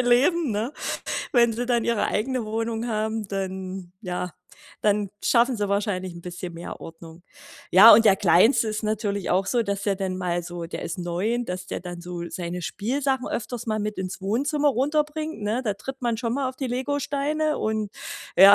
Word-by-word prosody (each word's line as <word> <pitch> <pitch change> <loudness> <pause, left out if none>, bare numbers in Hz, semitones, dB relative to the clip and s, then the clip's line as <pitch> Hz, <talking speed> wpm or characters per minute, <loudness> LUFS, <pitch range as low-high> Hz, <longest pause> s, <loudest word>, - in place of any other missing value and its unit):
„leben“, 255 +4 +3
ne? 220 +6 -2 0.6
Wenn 235 -2 +5
sie 245 +2 -2
dann 240 -2 +1
ihre 235 -2 +1
eigene 255 +2 -1
Wohnung 225 +1 -2
haben, 220 -1 -1
dann 190 -2 -4
ja, 180 -1 -3 0.5
dann 210 -1 +2 0.2
schaffen 240 0 +4
sie 205 - 0
wahrscheinlich 200 -3 -1
'n 170 - -9
bisschen 175 0 -6
mehr 170 +1 -7
Ordnung. 165 +1 -11 0.5
Ja, 205 +5 +10
und 225 - +5
der 200 -3 +6
Kleinste 205 +6 +5
ist 215 +1 -2
natürlich 210 -3 -1
auch 190 +1 +2
so, 240 -2 +2
dass 200 -1 -2
der 200 -2 +1
dann 190 -1 -2
mal 175 -1 -1
so 175 0 -6
der 165 - -6
ist 170 +3 -4
9, 195 +8 -1
dass 180 0 -4
der - - -4
dann 175 -1 -7
so 175 -1 -5
seine 175 0 -4
Spielsachen 260 +8 -1
öfters 240 +1 -4
mal 215 -1 0
mit 210 0 -2
ins 190 0 -4
Wohnzimmer 285 +9 +1
runterbringt, 300 +2 0
ne? 220 +5 0
Da 210 - +1
tritt 265 +7 -8
man 235 -2 0
schon 235 -1 -1
mal 270 -2 0
auf 260 - -17
die 265 - -2
Legosteine 285 +4 -1
und 215 -2 -1 0.5
ja. 195 +2 +10
215 Hz, 190 wpm, -25 LUFS, 185-245 Hz, 0.6 s, Ja